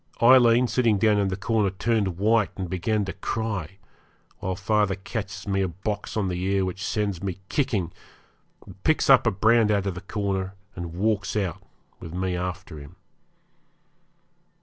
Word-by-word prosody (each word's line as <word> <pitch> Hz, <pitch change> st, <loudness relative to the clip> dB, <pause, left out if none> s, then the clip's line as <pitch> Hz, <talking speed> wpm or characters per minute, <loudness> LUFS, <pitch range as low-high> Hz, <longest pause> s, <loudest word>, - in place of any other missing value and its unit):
Aileen, 120 Hz, 0 st, +6 dB
sitting 115 Hz, -2 st, +2 dB
down 105 Hz, +1 st, +3 dB
in 100 Hz, -, +1 dB
the 95 Hz, -, -1 dB
corner, 105 Hz, +1 st, +1 dB
turned 100 Hz, -2 st, -1 dB
white, 110 Hz, +1 st, +3 dB
and 95 Hz, -2 st, -3 dB
began 100 Hz, +4 st, -1 dB
to 95 Hz, -, -5 dB
cry, 100 Hz, -3 st, -3 dB, 0.6 s
while 95 Hz, 0 st, -2 dB
father 105 Hz, 0 st, +1 dB
catches 100 Hz, -1 st, -6 dB
me 95 Hz, -1 st, +1 dB
a 95 Hz, -, +1 dB
box 100 Hz, +5 st, -4 dB
on 100 Hz, -3 st, 0 dB
the 90 Hz, -1 st, -3 dB
ear 95 Hz, 0 st, +1 dB
which 95 Hz, +1 st, -5 dB
sends 100 Hz, -5 st, -1 dB
me 95 Hz, -3 st, -3 dB
kicking, 100 Hz, -, 0 dB, 0.9 s
picks -, -, +3 dB
up -, -, +6 dB
the -, -, +3 dB
brand 110 Hz, +3 st, +3 dB
out 100 Hz, -2 st, +1 dB
of 100 Hz, -, -1 dB
the 90 Hz, -, -8 dB
corner, 100 Hz, -2 st, -3 dB, 0.2 s
and 85 Hz, -1 st, -6 dB
walks 100 Hz, +1 st, 0 dB
out, 95 Hz, -6 st, -2 dB, 0.4 s
with 80 Hz, +1 st, -8 dB
me 90 Hz, 0 st, -1 dB
after 90 Hz, -2 st, -5 dB
him. 70 Hz, 0 st, -12 dB
100 Hz, 165 wpm, -25 LUFS, 95-110 Hz, 0.9 s, Aileen